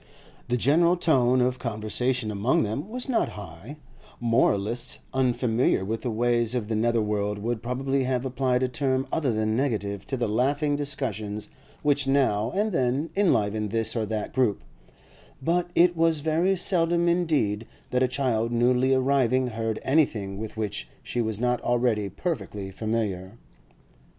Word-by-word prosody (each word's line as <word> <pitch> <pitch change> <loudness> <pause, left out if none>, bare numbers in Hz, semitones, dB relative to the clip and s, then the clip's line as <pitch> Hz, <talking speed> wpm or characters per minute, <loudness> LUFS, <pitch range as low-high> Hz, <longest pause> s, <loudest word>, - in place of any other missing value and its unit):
The 125 0 +1
general 170 +8 +3
tone 130 -6 +3
of 125 0 0
conversation 115 +1 -1
among 105 +5 +1
them 115 - -3
was 250 +4 -4
not 245 -4 +1
high; 100 - -9 0.4
moralists 115 -1 +1 0.2
unfamiliar 125 -5 +1
with 110 +3 -3
the 125 - -2
ways 120 +1 +1
of 115 -4 -2
the 110 - 0
nether 115 +1 +2
world 105 -1 -1
would 110 +2 -3
probably 135 +2 -1
have 130 0 -1
applied 130 0 0
a - - +2
term 130 0 0
other 145 -6 +1
than 110 0 0
negative 100 -7 -2
to 135 - -2
the 120 -2 0
laughing 140 +7 +1
discussions 110 -8 -3 0.3
which 145 -2 +2
now 125 -6 +2
and 210 +2 +1
then 135 0 0
enlivened 110 - +1
this 115 +1 0
or 110 -2 -1
that 110 -1 -3
group; 125 - +1 0.8
but 175 +4 0
it 175 +1 +5
was 165 -2 +2
very 165 +5 +2
seldom 170 -1 +2
indeed 150 - +1 0.2
that 125 - +1
a 130 - +4
child 125 -3 0
newly 125 +2 +3
arriving 130 -1 +2
heard 115 -1 -3
anything 110 -9 +1
with 110 0 -7
which 105 -1 -3
she 120 - -2
was 110 -2 -2
not 125 0 0
already 120 -4 +1
perfectly 100 - -4
familiar. 105 -2 -3
125 Hz, 155 wpm, -26 LUFS, 110-140 Hz, 0.8 s, it